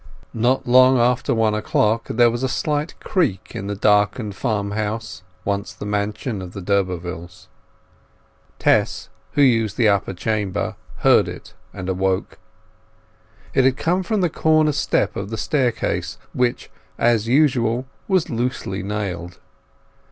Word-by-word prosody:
Not 120 +4 +1
long 130 +1 +6
after 120 +1 +2
one 110 -1 +2
o'clock 110 +1 +1
there 120 0 +4
was 120 +1 -3
a 130 - 0
slight 150 +4 -2
creak 140 - -1
in 105 -4 -5
the 100 - -3
darkened 105 +1 +2
farmhouse 110 0 -3 0.2
once 100 0 -2
the - - -8
mansion 105 +1 -2
of 90 -1 -8
the - - -6
d'Urbervilles. 90 -2 -3 1.1
Tess, - - +1 0.2
who 145 - +4
used 115 -5 +2
the 115 -3 +4
upper 100 -1 0
chamber, 105 -1 -2 0.3
heard - - +6
it - - -9 0.2
and 90 - -7
awoke. 95 0 -1 1.1
It 135 - +4
had 130 0 +3
come 180 +3 +1
from 205 +2 -1
the 175 - +2
corner 155 -2 +3
step 140 - 0
of 100 0 -4
the 110 - -4
staircase, 130 -6 -1 0.2
which, 125 -1 -1 0.3
as 115 -2 +2
usual, 125 -3 +2 0.2
was 185 -3 +2
loosely 120 - -3
nailed. 95 -4 -4
110 Hz, 135 wpm, -21 LUFS, 100-130 Hz, 1.1 s, long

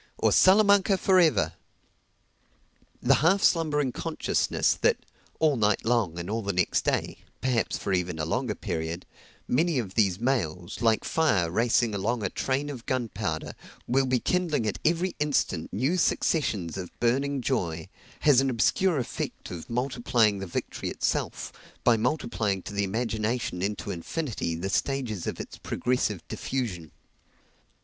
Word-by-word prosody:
or - - +2
"Salamanca 200 0 +5
for 185 0 +4
ever!" 150 - +3 1.5
The - - +5
half 185 +6 +3
slumbering 150 -5 +2
consciousness - - 0
that, - - +4 0.4
all 155 -3 +3
night 105 -2 +1
long 110 -8 +1
and 85 0 -5
all 110 +3 -2
the 100 -1 -1
next 90 +1 +1
day - - -1 0.2
perhaps 125 -3 0
for 100 - -2
even 90 -2 -1
a 80 - -2
longer 120 +5 -1
period 80 +2 -4 0.4
many 160 +4 +2
of 105 -7 -3
these 100 -4 +2
mails, 100 - -2
like 115 -2 +3
fire 105 - +1
racing 115 +2 +2
along 110 +3 -1
a 95 - -1
train 140 +2 -1
of 125 -4 -9
gunpowder, 110 -10 -2 0.3
will 135 +2 +2
be 125 -1 +2
kindling 165 -6 0
at 105 - -2
every 170 +3 +1
instant 140 - 0
new 135 - 0
successions 105 - 0
of 90 -2 -5
burning 135 +4 +1
joy, 85 -11 -2 0.3
has 140 -4 +5
an 135 - +1
obscure 155 +8 +2
effect 125 - -4
of 85 -2 -7
multiplying 120 -4 +1
the 95 - -5
victory 85 - -4
itself, - - -2 0.3
by 120 - +5
multiplying 110 - -1
to 105 - -7
the 100 0 0
imagination 110 -1 -2
into 100 -3 -2
infinity 105 - -3
the 85 +4 -3
stages 115 -3 -1
of - - -4
its - - -8
progressive 115 -7 -1
diffusion. 95 - -4
115 Hz, 145 wpm, -27 LUFS, 95-140 Hz, 1.5 s, Salamanca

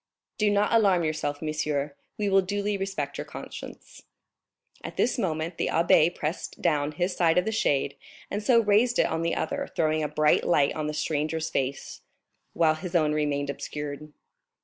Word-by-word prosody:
"Do 210 -1 +3
not 205 +2 +2
alarm 195 -6 +4
yourself, 155 -1 -2
monsieur, 150 -2 -2 0.2
we 210 - -1
will 195 0 +4
duly 205 +2 -2
respect 195 0 -3
your - - -4
conscience." - - -10 0.8
At - - -7
this 245 - +1
moment 165 -3 -2
the - - +1
abbé 170 0 +4
pressed 155 +4 -4
down 150 -3 +1
his 180 +3 -1
side 165 -1 +3
of 180 - +3
the 220 - -1
shade 140 -9 +1 0.4
and 205 - -2
so 235 +2 +4
raised 225 +3 +3
it - - +4
on 160 0 -1
the 165 0 0
other, 285 0 -2
throwing 155 -1 +1
a 150 - 0
bright 150 0 +2
light 145 -5 +3
on 155 -1 -2
the 150 - -3
stranger's 155 +1 -1
face, 135 +1 -3 0.5
while 160 -2 +3
his 180 +3 -7
own 155 -3 +3
remained 145 -2 0
obscured. 150 +1 -6
160 Hz, 175 wpm, -27 LUFS, 150-195 Hz, 0.8 s, alarm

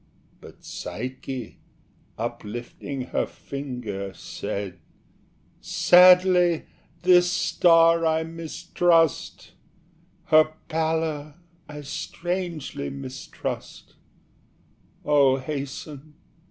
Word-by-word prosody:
But - - -15
Psyche, 130 0 -6 0.6
uplifting 120 +5 -5
her - - 0
finger, 125 -9 -6
Said 95 -3 -6 0.8
"Sadly 180 -1 +5 0.4
this 180 -1 +5
star 165 -1 +4
I 160 0 +2
mistrust 165 0 0 0.7
Her 155 0 +4 0.2
pallor 160 -2 -1 0.3
I 150 0 -8
strangely 170 0 -4
mistrust: 135 -1 -7 1.1
Oh, 140 -3 +4
hasten! 145 +2 -7
155 Hz, 65 wpm, -25 LUFS, 135-165 Hz, 1.1 s, Sadly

